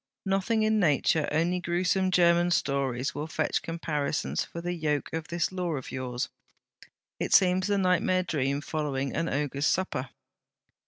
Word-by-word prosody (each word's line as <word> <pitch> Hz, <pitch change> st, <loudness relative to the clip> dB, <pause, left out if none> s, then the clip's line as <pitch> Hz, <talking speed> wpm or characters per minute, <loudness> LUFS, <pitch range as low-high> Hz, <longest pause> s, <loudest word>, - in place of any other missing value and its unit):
Nothing 195 Hz, +3 st, +1 dB
in 215 Hz, 0 st, +2 dB
nature, 155 Hz, -2 st, +2 dB
only 170 Hz, +4 st, +1 dB
gruesome 180 Hz, +2 st, +1 dB
German 175 Hz, -1 st, +4 dB
stories 135 Hz, -4 st, 0 dB
will 150 Hz, +2 st, -4 dB
fetch 155 Hz, -1 st, -1 dB
comparisons 150 Hz, -, -2 dB
for 170 Hz, -, -8 dB
the 175 Hz, +1 st, -3 dB
yoke 150 Hz, -4 st, -1 dB
of 160 Hz, 0 st, -3 dB
this 170 Hz, +1 st, -1 dB
Law 180 Hz, -3 st, -2 dB
of 135 Hz, -4 st, -5 dB
yours. 125 Hz, -1 st, -3 dB, 0.9 s
It -, -, -1 dB
seems 185 Hz, 0 st, +4 dB
the 205 Hz, -1 st, +1 dB
nightmare 185 Hz, -1 st, +2 dB
dream 140 Hz, -4 st, -1 dB
following 140 Hz, -4 st, -2 dB
an 165 Hz, +2 st, 0 dB
ogre's 140 Hz, 0 st, -1 dB
supper.' 135 Hz, -9 st, -1 dB
165 Hz, 150 wpm, -28 LUFS, 140-180 Hz, 0.9 s, German